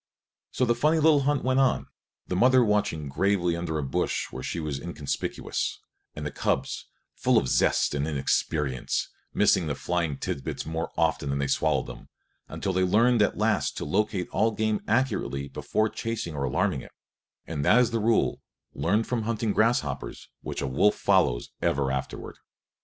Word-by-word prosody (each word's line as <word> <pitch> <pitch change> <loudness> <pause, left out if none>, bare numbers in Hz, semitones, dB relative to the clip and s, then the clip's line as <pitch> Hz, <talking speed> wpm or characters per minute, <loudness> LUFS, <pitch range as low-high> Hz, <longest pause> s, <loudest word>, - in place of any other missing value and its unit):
So 130 - 0
the 120 - +3
funny 150 +7 +2
little 155 -1 +5
hunt 140 0 +1
went 130 +1 +2
on, 135 -2 +2 0.4
the 90 - -3
mother 125 +5 +5
watching 105 -8 0
gravely 90 +3 +1
under 85 -2 -3
a 75 - -2
bush 65 - -1
where 65 - -6
she 85 - -3
was 75 -4 -3
inconspicuous, 80 -5 -3 0.4
and 75 - -5
the 75 - -3
cubs, - - -2 0.3
full - - +2
of - - +2
zest - - +2
and 75 +1 -1
inexperience, 70 -2 -1 0.2
missing - - +3
the - - -1
flying 85 -5 -1
tidbits 65 - -4
more 80 +1 -3
often 70 - +1
than 70 - 0
they 70 - 0
swallowed - - +1
them, - - -11 0.4
until - - -3
they 95 - +2
learned 115 +5 +4
at 105 - +2
last 110 +1 +1
to - - -3
locate 95 +4 0
all 110 - +2
game 110 -1 -1
accurately 105 - 0
before 110 +9 -1
chasing 115 -5 -4
or 70 -2 -2
alarming 65 - 0
it; - - -14 0.5
and 75 -3 -3
that 105 - +5
is 125 -1 +3
the 115 - 0
rule, 115 +1 +1 0.3
learned 105 +6 +1
from 125 -2 -1
hunting 110 -1 -1
grasshoppers, 110 - 0
which - - -4
a - - -1
wolf 70 +11 +3
follows - - +2
ever 70 -1 +1
afterward. 65 -1 -5
95 Hz, 175 wpm, -27 LUFS, 75-115 Hz, 0.5 s, little